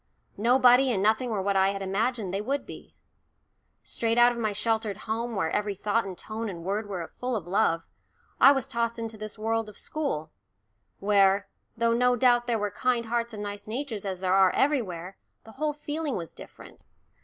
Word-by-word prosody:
Nobody 250 +3 +5
and 195 -4 0
nothing 220 +4 +2
were 205 -4 -1
what 200 0 0
I 190 0 +4
had 195 0 -5
imagined 205 0 -1
they 195 - -1
would 275 +6 -2
be. - - -12 0.9
Straight 230 0 -1
out 240 0 +7
of 240 - -6
my 215 -2 0
sheltered 215 -1 -1
home, 230 +1 -2
where 165 -5 0
every 205 -1 -1
thought 210 +3 0
and 185 -2 -7
tone 220 0 -5
and 170 -3 -7
word 205 +3 -2
were 175 -4 -4
full 250 0 -4
of 200 -7 -3
love, 175 -3 +1 0.5
I 275 - +9
was 270 -3 0
tossed 235 0 -1
into 225 -1 -5
this 215 +1 -7
world 225 0 -1
of 210 - -11
school, 280 - -3 0.7
where, 200 -1 +3 0.3
though 230 0 +2
no 250 +1 +3
doubt 245 0 +3
there 235 -2 +1
were 210 -1 -2
kind 240 +3 0
hearts 235 +1 -1
and 210 - -5
nice 205 0 -6
natures 230 -2 -4
as 190 -2 -4
there 185 -1 +1
are 190 -1 +6
everywhere, 195 - 0 0.3
the 220 - -13
whole 300 +5 -1
feeling 295 -1 -4
was 165 -3 -6
different. - - -13
220 Hz, 195 wpm, -27 LUFS, 195-240 Hz, 0.9 s, I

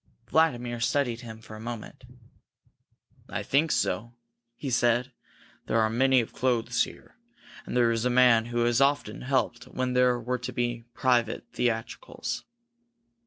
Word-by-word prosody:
Vladimir 125 -7 +2
studied 120 -1 0
him 110 -2 -9
for 110 -1 -11
a - - -9
moment. 115 +2 -7 1.2
"I - - -3
think 150 +3 +2
so," 115 +6 -1 0.4
he 135 0 -5
said. 120 +1 +2 0.6
"There 115 - +2
are 110 0 +2
plenty 130 +2 +4
of 115 - -8
clothes 120 -2 +1
here, - - -14 0.5
and - - -2
there 120 -1 +4
is 115 -1 -1
a 125 - +2
man 125 -2 +5
who 120 0 -1
has 120 +2 +2
often 140 -6 +1
helped 130 -2 -1
when 130 0 -2
there 125 -1 +3
were 125 +2 -2
to 125 - -5
be 120 -1 -2
private 120 -3 +1
theatricals." 120 - -3
120 Hz, 150 wpm, -27 LUFS, 115-125 Hz, 1.2 s, man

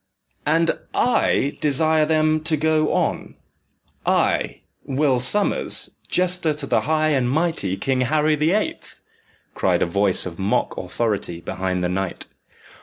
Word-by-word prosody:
"And 165 +2 +1 0.2
I 145 - +1
desire 155 +2 +2
them 155 0 +2
to 160 -1 +1
go 155 0 +1
on - - -2 0.7
I, - - 0 0.2
Will 135 -2 +1
Sommers, 200 +12 +3 0.2
jester 180 -4 +1
to 145 -1 -4
the - - +1
high 155 +1 +1
and 130 -5 +1
mighty 145 - -1
King 130 +5 -1
Harry 155 +4 +2
the 150 +2 +1
Eighth!" 215 +2 -3 0.5
cried - - +1
a - - +2
voice 100 +2 +1
of 85 -1 -7
mock 95 +2 0
authority 105 -7 -3
behind 90 +1 -3
the 90 - 0
knight. 95 0 -3
150 Hz, 135 wpm, -21 LUFS, 105-155 Hz, 0.7 s, Sommers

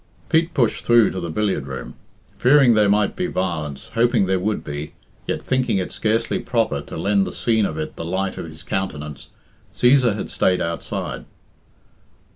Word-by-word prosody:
Pete 165 +1 +2
pushed 120 -6 +1
through 120 -2 +5
to 95 - -4
the 85 -1 -4
billiard 95 -6 -1
room. 65 -2 -6 0.5
Fearing 135 -2 +6
there 105 -2 +4
might 105 0 +2
be 180 - -1
violence, 80 - -3
hoping 115 -3 +3
there 95 0 +1
would 105 +3 -1
be, 75 +1 -6 0.3
yet - - -2
thinking 130 -5 +1
it 95 - -2
scarcely 110 +1 0
proper 115 -2 0
to - - -8
lend 100 -1 +1
the - - -4
scene 110 -3 +1
of 75 - -6
it 80 - -5
the - - -4
light 95 +3 -2
of - - -5
his 80 0 -11
countenance, 75 -7 -4 0.4
Cæsar 125 -3 +4
had 105 - -5
stayed 90 -1 +2
outside. 85 -7 -4
100 Hz, 175 wpm, -21 LUFS, 85-115 Hz, 0.5 s, Fearing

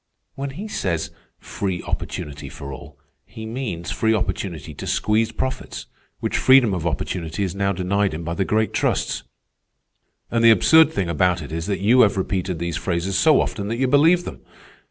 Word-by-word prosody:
"When 140 +1 -4
he 180 +11 -7
says 85 - -2 0.3
'free 95 -3 -4
opportunity 70 -1 -5
for 70 0 -8
all,' 65 - -11 0.3
he 110 - -10
means 110 -8 -4
free 110 0 +1
opportunity 95 -4 -3
to - - -8
squeeze 110 +1 +1
profits, 130 0 -4 0.4
which - - -1
freedom 130 -5 +5
of 85 -2 -2
opportunity 85 +2 -3
is 90 -3 -2
now 100 0 0
denied 100 0 0
him 85 - -6
by 85 +1 -3
the 95 - 0
great 110 +3 0
trusts. - - 0 1.1
And 115 0 +1
the 115 - +8
absurd 160 +7 +6
thing 100 - -1
about 90 +1 +1
it 75 - -9
is 80 +1 -4
that 100 -2 -2
you 120 +5 +5
have 100 -3 +4
repeated 95 -2 -2
these 85 0 -3
phrases 90 +2 -2
so 155 +10 +5
often 100 -1 -3
that 115 +2 -2
you 130 +1 +1
believe 160 +6 +4
them. - - -8
100 Hz, 180 wpm, -22 LUFS, 85-115 Hz, 1.1 s, the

